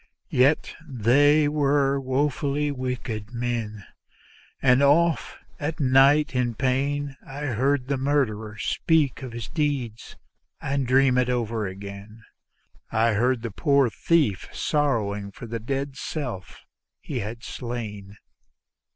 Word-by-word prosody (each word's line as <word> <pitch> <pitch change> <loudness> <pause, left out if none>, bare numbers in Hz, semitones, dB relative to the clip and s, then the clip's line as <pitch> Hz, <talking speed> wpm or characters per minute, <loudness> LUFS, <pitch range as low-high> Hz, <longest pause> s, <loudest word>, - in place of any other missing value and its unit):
Yet 135 +5 +3
they 145 +3 +3
were 140 -2 +2
woefully 140 +2 0
wicked 125 -4 -4
men, 115 -4 -3 0.7
and 125 0 +4
often 160 +4 +3 0.2
at 155 +2 -3
night 140 +2 +4
in 125 -2 0
pain 135 +3 -1
I 140 +1 -8
heard 135 0 0
the 140 0 0
murderer 115 -6 -1
speak 150 - +1
of 130 -2 -6
his 115 -2 -6
deed 140 -8 -2 0.6
and 135 -2 -1
dream 130 0 +4
it 125 0 +1
over 115 -4 -1
again; 100 +3 -9 0.7
I 115 0 +2
heard 120 +2 +1
the 115 - -4
poor 140 - +2
thief 145 - +1
sorrowing 105 -9 -1
for 120 - -10
the 115 0 -4
dead 135 +4 -3
self 125 - -6 0.3
he - - -5
had 110 +4 -6
slain. 105 -5 -6
130 Hz, 120 wpm, -25 LUFS, 115-140 Hz, 0.7 s, and